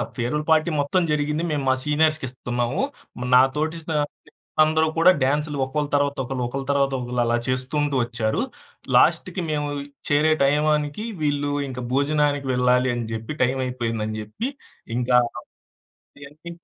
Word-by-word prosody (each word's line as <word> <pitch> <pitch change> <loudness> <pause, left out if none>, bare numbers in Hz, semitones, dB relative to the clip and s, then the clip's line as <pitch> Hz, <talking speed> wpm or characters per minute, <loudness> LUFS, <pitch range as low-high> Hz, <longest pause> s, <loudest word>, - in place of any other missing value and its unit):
Farewell 130 +5 -1
party 155 +1 +4
మొత్తం 145 +6 +1
జరిగింది. 150 +2 0
మేము 145 -2 -1
మా 130 - +5
సీనియర్స్‌కి 155 0 +2
ఇస్తున్నాము. 120 - -2 0.5
నా 125 - +9 0.2
తోటి 155 +2 -1
నా 155 - +1 0.4
స్నేహితులందరూ 155 +1 +2
కూడా 170 +3 +7
డాన్స్‌లు 150 +2 0
ఒకళ్ళు 145 +2 -2
తర్వాత 140 0 +1
ఒకళ్ళు, 125 0 -3
ఒకళ్ళు 135 +2 -5
తర్వాత 140 -1 +2
ఒకళ్ళు 125 0 -2
అలా 120 0 +2
చేసుకుంటూ 135 +3 0
ఒచ్చారు. 120 -2 -1 0.6
లాస్ట్‌కి 185 0 +2
మేము 150 -1 -1 0.4
చేరే 150 +2 +4
టైంకి 150 +4 +1 0.2
వీళ్ళు 145 -1 0 0.2
ఇంకా 125 -1 -6
భోజనానికి 145 0 +1
వెళ్ళాలి 125 0 +3
అని 120 -1 -3
జెప్పి 115 +6 -5
టైమయిపోయిందని 120 -4 -2
జెప్పి 105 - -4 0.5
ఇంకా 125 0 +3 1.1
ఇయన్ని 150 +4 -11
140 Hz, 135 wpm, -23 LUFS, 125-150 Hz, 1.1 s, నా